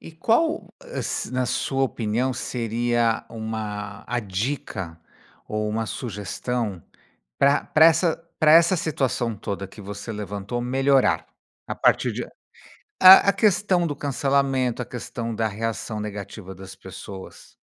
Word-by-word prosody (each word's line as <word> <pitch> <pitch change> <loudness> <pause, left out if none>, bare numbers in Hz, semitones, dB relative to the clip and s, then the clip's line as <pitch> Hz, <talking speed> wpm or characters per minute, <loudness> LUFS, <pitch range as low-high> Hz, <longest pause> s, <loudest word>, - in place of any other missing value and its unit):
E 165 - -11
qual 275 - +1
es - - -4
na 130 0 0
sua 135 +2 -1
opinião, 120 0 0
seria 120 -1 0
uma 105 -3 -5
a 120 0 -1
dica 95 - -4 0.5
ou 105 0 -2
uma 110 +1 -2
sugestão 105 -2 -4 0.6
pra 140 +1 +3
pra 155 +1 +6
essa 165 0 +3 0.2
pra 155 -1 +5
essa 170 +3 +6
situação 135 -8 -1
toda 100 0 -5
que 100 - -13
você 100 +2 -7
levantou 105 +2 -4
melhorar, 135 +2 +2 0.4
a - - -3
partir - - +2
de - - -4 0.6
a 195 - +7
A - - +3
questão 190 -3 +2
do 145 - -3
cancelamento? 135 -3 0
A 120 - -4
questão 115 -1 -5
da 110 0 0
reação 110 +1 -4
negativa 100 -2 -7
das 95 +1 -11
pessoas? 95 0 -10
120 Hz, 130 wpm, -24 LUFS, 105-140 Hz, 0.6 s, a